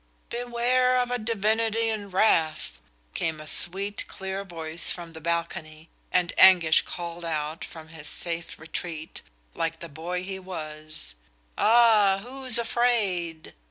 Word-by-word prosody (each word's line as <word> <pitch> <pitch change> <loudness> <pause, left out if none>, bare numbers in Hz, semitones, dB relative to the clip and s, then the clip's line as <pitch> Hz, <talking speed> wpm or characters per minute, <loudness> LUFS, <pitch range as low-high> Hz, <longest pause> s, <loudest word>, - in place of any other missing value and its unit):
"Beware 245 +1 +2
of 245 0 -1
a 245 - 0
divinity 225 +1 +1
in 210 -2 -3
wrath," 160 - +1 0.3
came 160 -2 -2
a 155 - -8
sweet, 195 +6 +1
clear 190 +1 -5
voice 165 -3 0
from 170 -2 -6
the 160 - -10
balcony, 165 -1 -3 0.2
and 180 -2 +2
Anguish 175 -4 +7
called 170 0 -6
out 155 -1 -3
from 160 -1 -10
his 160 -2 -9
safe 170 +1 -5
retreat, 160 0 -6 0.3
like 165 0 -2
the 170 - -8
boy 170 +4 -4
he 190 0 -5
was: 155 - -7 0.4
"Ah, 215 -4 +5
who's 255 0 0
afraid!" 210 -9 0
180 Hz, 130 wpm, -26 LUFS, 160-220 Hz, 0.4 s, Anguish